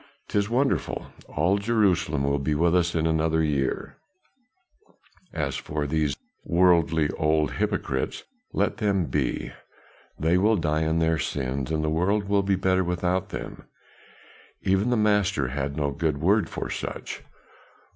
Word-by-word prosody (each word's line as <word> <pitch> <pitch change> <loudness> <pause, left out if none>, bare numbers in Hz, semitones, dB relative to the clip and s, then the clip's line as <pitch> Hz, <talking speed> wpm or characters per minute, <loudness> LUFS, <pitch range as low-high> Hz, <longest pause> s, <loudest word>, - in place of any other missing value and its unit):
'Tis 100 0 0
wonderful; 135 +4 -1
all 90 +7 +1
Jerusalem 95 -9 +1
will 70 +1 +1
be 75 +2 0
with 85 +3 +3
us 85 -1 +2
in 80 -1 +1
another 80 0 +2
year; 70 -3 -1 1.3
as 70 -4 -2
for 75 0 -3
these 75 -1 0 0.3
worldly 85 -3 +3
old 75 -1 +2
hypocrites, 65 0 -2 0.3
let - - 0
them 100 -4 +1
be; 65 -3 -2 0.7
they 80 +4 +3
will 110 +3 +4
die 80 -2 0
in 80 +1 +1
their 80 -1 +2
sins 65 -1 -2
and 80 -1 0
the - - 0
world 95 +6 +1
will 100 0 +3
be 100 0 +1
better 95 0 +2
without 90 +1 -1
them. - - -7 1.0
Even 95 +5 +2
the 125 - +2
Master 100 -9 +2
had 70 +2 -3
no 70 -2 0
good 75 0 -1
word 100 +7 +2
for - - -4
such. - - -5
80 Hz, 145 wpm, -25 LUFS, 75-95 Hz, 1.3 s, will